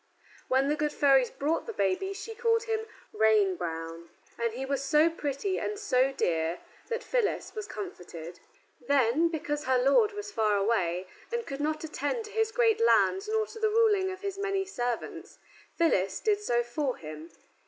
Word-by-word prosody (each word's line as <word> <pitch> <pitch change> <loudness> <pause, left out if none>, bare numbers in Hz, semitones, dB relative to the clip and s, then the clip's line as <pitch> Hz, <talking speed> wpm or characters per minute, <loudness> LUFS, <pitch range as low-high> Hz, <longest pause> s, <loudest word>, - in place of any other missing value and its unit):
When 265 +1 +2
the 295 - +2
good 300 0 -1
fairies 270 -4 +4
brought 310 +9 -1
the 455 - -4
baby 200 - 0
she 420 +3 -7
called 455 0 +1
him 445 0 -2 0.3
Reinbroun, 175 -6 +1 0.3
and 235 -1 0
he 255 +4 -4
was 275 0 -1
so 300 +4 +4
pretty 315 +5 -2
and 420 - -3
so 270 -10 +2
dear 165 -8 0 0.3
that 470 0 -3
Phyllis - - -1
was 430 -1 -5
comforted. 175 - -8 0.4
Then, 280 +3 +3
because 295 -2 -3
her 260 0 +3
lord 345 - +4
was 410 0 -6
far 215 -3 +2
away, 185 -4 0 0.3
and 470 -1 -2
could 275 +1 -5
not 310 +1 -1
attend 320 - -2
to 425 - -11
his 445 0 +1
great 455 -2 +3
lands 400 -3 +3
nor 440 0 +1
to 445 +1 -11
the 440 -1 +2
ruling 425 -4 +3
of 375 0 -7
his 395 -1 -4
many 390 -1 0
servants, 245 -10 -4 0.4
Phyllis 195 - +2
did 420 -1 +1
so 240 -11 +1
for 255 +2 -2
him. 155 +1 -9
295 Hz, 175 wpm, -29 LUFS, -, 0.4 s, fairies